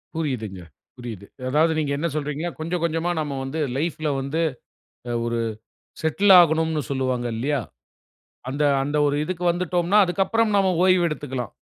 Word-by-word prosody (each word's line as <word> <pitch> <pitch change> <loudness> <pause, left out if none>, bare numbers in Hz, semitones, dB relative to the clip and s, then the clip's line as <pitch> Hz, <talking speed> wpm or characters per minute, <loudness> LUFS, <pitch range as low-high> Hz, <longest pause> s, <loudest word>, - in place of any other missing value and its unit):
புரியுதுங்க, 115 - -3 0.4
புரியுது. 115 -5 -7 0.2
அதாவது 155 +4 +3
நீங்க 145 -2 -1
என்ன 170 +3 -1
சொல்றீங்க 150 +2 -2
கொஞ்சம் 170 +2 -2
கொஞ்சமா 165 +1 0
நாம 145 -3 -3
வந்து 135 +4 -4 0.2
லைஃப்ல 155 0 -1
வந்து 140 +5 -2 0.7
அ - - -1
ஒரு 120 0 -1 0.6
செட்டில் 190 +6 +4
ஆகணும்னு 160 -2 +2
சொல்லுவாங்க 130 -2 -1
இல்லையா? 145 +5 0 0.9
அந்த 145 +3 -1 0.2
அந்த 145 +2 -1
ஒரு 145 - 0
இதுக்கு 180 +1 -4
வந்துட்டோம்னா 175 +2 +1
அதுக்கு 185 +2 +1
அப்பறம் 225 +1 +1
நாம 190 -1 +3
ஓய்வு 185 -2 +4
எடுத்துக்கலாம். 135 -6 -4
155 Hz, 145 wpm, -23 LUFS, 135-175 Hz, 0.9 s, செட்டில்